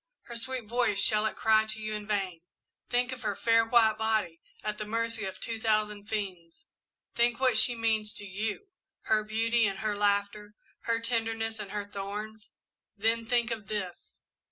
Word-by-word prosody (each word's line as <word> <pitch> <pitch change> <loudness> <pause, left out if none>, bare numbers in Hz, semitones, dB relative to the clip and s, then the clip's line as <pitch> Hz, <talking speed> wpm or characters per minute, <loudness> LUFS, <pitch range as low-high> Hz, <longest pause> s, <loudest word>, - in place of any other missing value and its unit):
Her 235 - -9
sweet 245 +1 -2
voice 235 -2 +1
shall 215 +1 +4
it - - -4
cry 220 0 +4
to 215 0 -4
you 215 0 -3
in 210 -1 -5
vain? 190 -5 -1 0.5
Think 245 +1 +1
of 255 -1 -6
her - - -1
fair 230 0 +4
white 225 -2 +4
body, 215 -7 0 0.2
at 210 0 -2
the 215 - -3
mercy 230 -1 -1
of 190 -1 -6
two 225 -1 -4
thousand 215 -2 0
fiends! 185 -6 -5 0.5
Think 235 0 +2
what 260 -3 +3
she 240 +2 +4
means 220 -2 0
to 205 - -5
you 210 - -4 0.3
her 215 -1 +2
beauty 225 +1 +2
and 195 -1 -3
her 215 -1 0
laughter 205 +1 0 0.3
her 230 0 +1
tenderness 225 -1 -1
and 205 -2 -6
her 205 0 -3
thorns 205 +2 -6 0.5
then 225 +2 +1
think 235 0 +2
of 215 -3 -4
this! 190 -4 -5
220 Hz, 180 wpm, -30 LUFS, 205-230 Hz, 0.5 s, shall